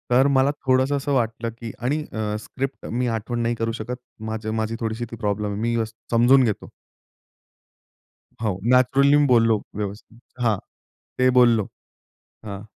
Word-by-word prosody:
तर 130 +3 +5
मला 140 0 +3
थोडंसं 130 +2 +3
असं 140 +1 -2
वाटलं, 115 -2 0
की 115 0 -8
आणि 130 +6 0
अ, 105 -1 -2
स्क्रिप्ट 135 +5 -5
मी 125 +2 -1
आठवण 120 +2 -4
नाही 120 0 0
करू 115 0 -1
शकत. 120 +2 -5 0.4
माझं 110 0 -3
माझी 110 0 -1
थोडीशी 115 0 -3
ती - - -5
प्रॉब्लेम 105 -2 -2
आहे. 100 +1 -4
मी 115 +1 0
अ, - - +1 0.3
समजून 120 +3 +6
घेतो. 110 -4 -2 1.7
हो, 105 -5 -1
नॅचरली 135 +3 +5
मी 145 - +4
बोललो 115 -3 +4 0.2
व्यवस्थित. 105 +2 -6 0.2
हां, 110 -4 +2 0.6
ते 130 0 +4
बोललो. 115 -4 +4 0.8
हां. 100 -2 -6
115 Hz, 155 wpm, -23 LUFS, 110-130 Hz, 1.7 s, समजून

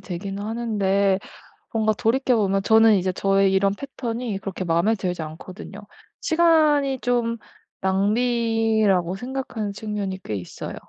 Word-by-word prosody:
되긴 195 +2 -6
하는데 200 -3 0 0.5
뭔가 220 -1 +1
돌이켜 250 +4 +1
보면 195 -2 +1
저는 220 0 +6
이제 185 -1 0
저의 195 +1 +2
이런 195 +1 +2
패턴이 235 -3 -4
그렇게 195 -1 -5
마음에 170 +6 +2
들지 180 -4 -3
않거든요. 180 +5 -9 0.4
시간이 305 -5 +3
좀 235 -1 0 0.4
낭비라고 220 -2 +1
생각하는 245 -2 -4
측면이 205 -2 -4
꽤 105 - -4
있어요. 90 -3 -7
210 Hz, 300 characters per minute, -23 LUFS, 190-235 Hz, 0.5 s, 저는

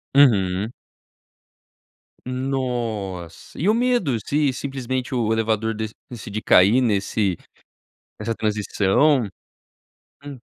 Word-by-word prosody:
Uhum. 105 -6 +4 1.5
Nossa! 120 -9 -4
E 185 +7 +2
o - - +5
medo 235 - +1
se 145 -1 +1
simplesmente 130 -1 -4
o 115 -3 0
elevador 110 0 0
dec 110 0 -4 0.2
decidir 110 -3 -6
cair 105 +8 +5
nesse 100 -4 0 0.8
nessa 115 - -2
transição? 110 +5 +2 1.0
Hum. 140 -3 -8
115 Hz, 90 wpm, -22 LUFS, 105-135 Hz, 1.5 s, o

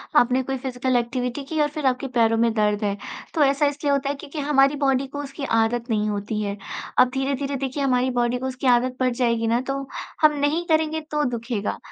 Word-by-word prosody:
आपने 250 +2 +4
कोई 265 +1 -3
physical 255 0 -2
activity 245 +2 -1
की 315 +2 -3
और 295 - +3
फिर 300 -1 -5
आपके 260 +1 +1
पैरों 225 -1 +4
में 230 0 +3
दर्द 210 -1 +1
है। 200 -1 0 0.4
तो 315 - +3
ऐसा 280 +1 +3
इसलिए 290 0 0
होता 280 0 +1
है, 285 - -1
क्योंकि 280 +2 -8
हमारी 280 -1 +3
बॉडी 270 0 +2
को 285 +2 -7
उसकी 275 +1 -8 0.2
आदत 235 +2 0
नहीं 215 -1 +1
होती 210 +1 -2
है। 200 0 -3 0.4
अब 255 0 +6
धीरे-धीरे 275 +1 -1
देखिए 275 +1 -2
हमारी 255 -1 +2
बॉडी 240 +1 +1
को 260 - -4
उसकी 260 +1 -3
आदत 250 +1 +3
पड़ 255 0 +3
जाएगी 235 -2 0
ना, 235 +2 +2
तो 275 +1 -4 0.3
हम 305 -1 +6
नहीं 300 +4 +1
करेंगे, 315 0 +1
तो 300 -1 -2
दुखेगा। 230 -3 -3
260 Hz, 215 wpm, -23 LUFS, 235-280 Hz, 0.4 s, अब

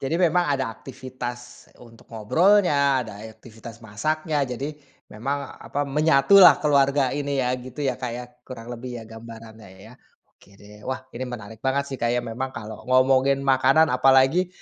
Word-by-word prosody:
Jadi 145 +5 -2
memang 175 -2 +2
ada 135 -2 0
aktivitas 125 -1 -9
untuk 115 -1 -18
ngobrolnya, 140 - +2
ada 105 -2 -10
e 110 - -9
aktivitas 115 0 -13
masaknya. 155 +8 -2
Jadi 135 +5 -5 0.4
memang, 135 +5 -4
apa, 145 +1 -3
menyatulah 150 +6 +5
keluarga 140 -2 +2
ini 140 0 -3
ya, 125 - 0
gitu 130 +3 -7
ya, 130 -1 -2
Kak, 125 -2 -3
ya, 125 - -7 0.2
kurang 120 -1 -8
lebih 120 +1 -7
ya 115 - -9
gambarannya 110 -1 -12
ya? 110 +5 -15 0.4
Oke 100 0 -23
deh. 105 +1 -16
Wah, 130 0 -4
ini 130 +2 -5
menarik 110 -2 -9
banget 135 +1 0
sih, 135 - -5
Kak, 120 - 0
ya. 120 - -2
Memang 125 +4 -4
kalau 105 0 -8
ngomongin 135 +1 +3
makanan, 135 +3 +3
apalagi 135 +7 +3
130 Hz, 165 wpm, -23 LUFS, 115-140 Hz, 0.4 s, menyatulah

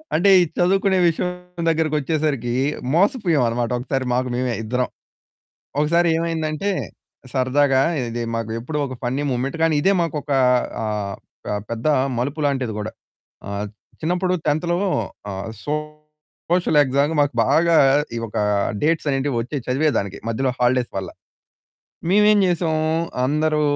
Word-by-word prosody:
అంటే 190 +5 +4
ఈ - - +5
చదువుకునే 190 +1 +3
విషయం 180 0 -4
దగ్గరకొచ్చేసరికి 150 -5 0 0.4
మోసపోయామన్నమాట. 160 - +2
ఒక్కసారి 130 +1 -2
మాకు 125 +1 0
మేమే 125 -1 -1
ఇద్దరం. 125 +2 -1 0.9
ఒకసారి 170 +3 +3
ఏమైందంటే, 165 +2 -1 0.6
సరదాగా 135 +1 +2 0.3
ఇది 120 +1 -3
మాకు 115 -1 -3
ఎప్పుడూ 150 +6 -4
ఒక 130 - -6
ఫన్నీ 130 +4 -1
ముమెంట్ 130 +5 -2
కానీ 165 -1 +3
ఇదే 195 - +3
మాకు 160 -2 -2
ఒక 145 - -11 0.5
ఆహ్, 105 -2 -3 0.4
ఆహ్, 105 - -2
పెద్ద 115 +4 -4 0.3
మలుపు 140 +5 -2
లాంటిది 130 -5 -1
గూడా. 105 +1 -4 0.6
ఆహ్, 100 +1 -3 0.4
చిన్నప్పుడు 180 +3 0
10థ్‌లో 150 +3 +1 0.7
ఆహ్, 95 0 -5 0.2
సోషల్ 150 +2 -2
ఎక్సామ్‌కి 140 +4 +1
మాకు 145 -2 +1
బాగా 165 +4 +4 0.4
ఈ - - -1
ఒక 105 - -6 0.5
డేట్స్ 160 0 +1
అనేటివి 135 0 -1
వచ్చి 125 +6 -4
చదివేదానికి 125 -7 0
మధ్యలో 130 +3 0
హాలిడేస్ 125 0 +2
వల్ల. 95 -2 -4 1.0
మేమేం 210 +2 +5
జేసాం, 170 -3 +1 0.5
అందరూ 150 +2 +1
145 Hz, 125 wpm, -21 LUFS, 125-165 Hz, 1.0 s, ఈ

